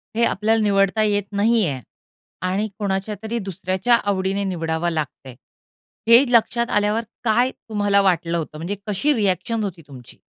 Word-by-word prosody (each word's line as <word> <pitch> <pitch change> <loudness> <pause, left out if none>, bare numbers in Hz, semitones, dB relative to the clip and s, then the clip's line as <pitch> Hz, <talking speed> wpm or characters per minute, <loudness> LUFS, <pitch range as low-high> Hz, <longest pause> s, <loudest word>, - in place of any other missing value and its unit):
हे 235 - +2
आपल्याला 220 +3 +1
निवडता 200 +1 +2
येत 205 -1 +1 0.2
नाहीये 210 - +2 0.7
आणि 200 +4 -1
कोणाच्यातरी 210 +3 -3
दुसऱ्याच्या 190 +3 0
आवडीने 195 0 -1
निवडावं 165 -3 -2
लागतंय, 140 -5 -5 0.7
हे 235 +3 +8
लक्षात 235 +1 +2
आल्यावर 210 +2 +1 0.2
काय 240 +3 +2
तुम्हाला 205 -4 0
वाटलं 170 -3 +1
होतं? 155 -2 -5
म्हणजे 170 +6 -4
कशी 210 +9 +1
रीॲक्शन 210 - 0
होती 185 -4 -5
तुमची? 130 -4 -13
200 Hz, 135 wpm, -21 LUFS, 180-220 Hz, 0.7 s, हे